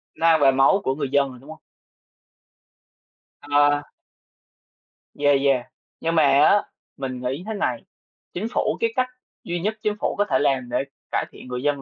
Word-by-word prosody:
Nó 165 - -2
ăn 160 -2 +5
vào 135 -1 +6
máu 135 +9 +4
của 130 - 0
người 140 -2 -3
dân 140 -1 +3
rồi, 130 -1 -12
đúng 135 +4 -16
hông? 160 - -10 1.8
Ờ. 145 0 +3 1.3
Yeah, 145 0 +3
yeah. 135 -3 +2 0.4
Nhưng 165 +1 -1
mà 160 - +5
á, 145 +8 +5 0.4
mình 130 -2 -5
nghĩ 130 +7 -3
thế 220 - -3
này, 125 - -2 0.5
chính 195 +5 -3
phủ - - 0
cái 455 0 0
cách 255 - +1 0.4
duy 175 0 -3
nhất 215 +5 -2
chính 210 -2 0
phủ - - -1
có 205 - +2
thể - - +2
làm 135 -4 0
để 120 - 0 0.3
cải - - 0
thiện - - -13
người 125 0 -4
dân 145 -1 0
145 Hz, 185 wpm, -23 LUFS, 135-170 Hz, 1.8 s, vào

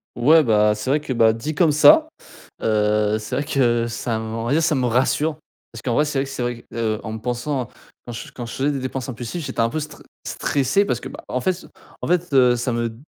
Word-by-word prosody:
Ouais, 155 +6 +5
bah, 105 -3 +3
c'est 105 +5 -3
vrai 150 - +3
que, 145 - -6
bah, 115 -2 +4
dit 130 +8 -5
comme 160 0 +4
ça, 305 - +6 0.5
heu, 105 -1 +1
c'est 110 +3 -5
vrai 145 - 0
que 120 -5 +1
ça 115 -1 -3
me 110 - -5
on 115 - -3
va 120 - -1
dire, 160 +3 +3
ça 160 -1 +2
me 130 -2 0
rassure 140 +6 +1 0.3
parce - - -10
qu'en 120 -3 -1
vrai, 150 - +3
c'est 145 -2 -1
vrai 135 - 0
que - - -9
c'est 135 -2 -4
vrai, 120 -1 -4
heu, 110 -2 -1
en 110 - -5
me - - -4
pensant 125 +3 -3 0.4
quand 120 - -7
je 115 +1 -8
quand 120 - -7
je 115 - -8
faisais 140 +2 0
des 140 - -2
dépenses 130 0 -4
impulsives, 125 +7 -5
j'étais - - -6
un 115 - +3
peu 155 - -3
str 150 0 -8 0.2
stressé 145 +9 +1
parce 120 - -1
que, - - -8
bah, - - -10
en 125 - -2
fait, 185 - +1
c 180 - -12 0.3
en - - -3
fait, 175 -1 0
heu, 125 -3 +5
ça 120 +1 -2
me 115 0 -1
d 110 - -12
125 Hz, 265 wpm, -21 LUFS, 115-145 Hz, 0.5 s, ça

